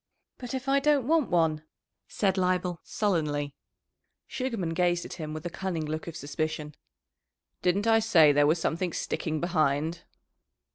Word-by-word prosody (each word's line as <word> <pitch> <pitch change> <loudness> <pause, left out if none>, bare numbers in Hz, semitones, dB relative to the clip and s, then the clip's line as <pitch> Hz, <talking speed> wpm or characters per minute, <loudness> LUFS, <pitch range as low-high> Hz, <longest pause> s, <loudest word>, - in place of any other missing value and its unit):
"But 250 0 -5
if 260 +1 -5
I 275 +1 +4
don't 285 -3 +2
want 320 -3 +2
one?" 160 -3 +2 0.5
said 195 -3 0
Leibel 180 -2 0
sullenly. 150 -8 -1 0.7
Sugarman 230 -11 -3
gazed 175 0 +1
at - - -7
him 155 0 -4
with 155 +2 -6
a - - -1
cunning 180 -4 -3
look 155 +2 -4
of 165 - -6
suspicion. 155 0 -3 0.9
"Didn't 190 +4 +1
I 225 0 +5
say 175 -9 +5
there 145 0 +4
was 160 +3 +3
something 170 +1 -1
sticking 155 -2 -2
behind?" 160 -1 0
175 Hz, 150 wpm, -28 LUFS, 155-200 Hz, 0.9 s, I